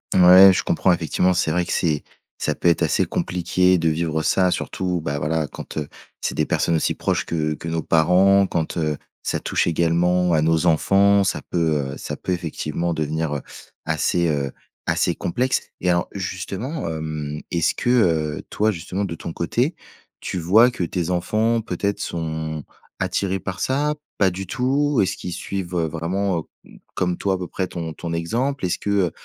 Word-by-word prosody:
Ouais, 95 +1 +9
je - - 0
comprends. 95 - +2
Effectivement, 90 +2 +1
c'est 85 -3 +1
vrai 90 +2 +1
que - - -3
c'est 75 -4 +1 0.4
ça - - -1
peut 85 - +2
être 85 - +2
assez - - +2
compliqué 90 +1 +1
de 85 -1 +1
vivre 80 0 -1
ça. 90 +3 +3
Surtout, 90 -2 -2
bah 70 -2 -2
voilà, 75 +1 0
quand - - -9
heu, 75 -2 -2 0.3
c'est - - -1
des - - +1
personnes 85 - +1
aussi 80 - +1
proches - - -1
que 75 -2 -1
que 80 - -8
nos 80 0 -1
parents, 95 +4 +4
quand 80 -2 -2
heu, 75 -2 0 0.3
ça - - -2
touche - - 0
également 85 +2 +2
à 80 -2 +3
nos 80 +1 +2
enfants, 100 +4 +4
ça - - -1
peut 80 -5 0
heu, - - -8
ça - - -5
peut - - -4
effectivement 85 -1 -2
devenir 80 0 -2
heu, 70 - -3 0.4
assez 85 -1 +1
heu, 70 -3 -1 0.3
assez - - +1
complexe. 125 +7 0 0.2
Et 90 - +1
alors 85 0 +2
justement 95 - -4
hem, 75 -2 -4
est-ce 85 -2 +1
que, - - -1
heu, 80 -11 +2
toi, 110 +1 +1
justement 95 +2 -4
de 90 -4 -3
ton 85 +1 -7
côté, 120 - 0 0.5
tu 90 - -3
vois 110 +9 +5
que 95 -8 -2
tes 85 0 -2
enfants 110 +6 +1
peut-être 100 0 -2
sont 80 -2 -3 0.4
attirés 95 +1 -1
par 95 0 -5
ça? 145 +3 +1 0.2
Pas 95 -2 +3
du 95 +2 -6
tout? 135 +5 +1
Est-ce 95 0 -1
qu'ils 90 - -6
suivent, 95 -2 -4
heu, 85 -2 +1
vraiment 85 +4 -1 0.3
heu, - - -18 0.2
comme 90 -1 0
toi 95 -1 0
à - - -3
peu 90 - -4
près 95 +1 -3
ton 85 -3 -5
ton 85 +2 -6
exemple? 115 +9 -1
Est-ce 90 - -1
que, - - -4
heu, 100 -4 +2
90 Hz, 190 wpm, -22 LUFS, 80-95 Hz, 0.5 s, Ouais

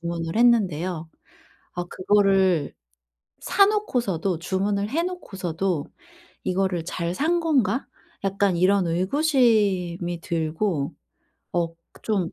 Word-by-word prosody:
주문을 170 -1 -4
했는데요. 185 -8 +2 0.7
아 175 - -3
그거를 190 -5 +2 0.7
사놓고서도 245 - +1
주문을 200 +4 -1
해놓고서도 195 - -2 0.6
'이거를 185 -2 0
잘 170 0 -3
산 330 - +1
건가?' 270 - +1 0.4
약간 195 -1 +1
이런 185 +1 +3
의구심이 190 - +1
들고 160 -1 -1 0.6
억 165 -1 -1 0.3
좀 195 -6 0
190 Hz, 210 characters per minute, -24 LUFS, 170-215 Hz, 0.7 s, 이런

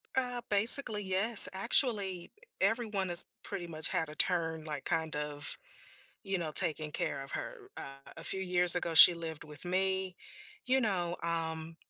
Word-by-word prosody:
Uh, 250 -2 -4
basically, 210 +1 +4
yes. 195 +4 +8
Actually, 195 -3 -3 0.3
everyone 215 -5 -3
has 175 0 +7 0.2
pretty 185 -4 -8
much 160 -2 -4
had 165 -4 -4
a 150 - -13
turn, 165 -2 -3
like, 150 -3 -8
kind 160 -1 -4
of, 150 -1 -5 0.7
you 195 -1 -4
know, 165 -3 -6
taking 155 0 +2
care 140 - -5
of 135 - -13
her. 450 -6 -9
Uh, 135 0 -13
a - - -11
few 190 - -2
years 180 -1 +3
ago, 170 -1 -4
she 170 +2 +7
lived 165 -2 -9
with 150 -1 -14
me, 190 0 -3 0.5
you 260 +1 -1
know, 180 -6 -3
um, 165 -1 -6
175 Hz, 160 wpm, -29 LUFS, 160-200 Hz, 0.7 s, yes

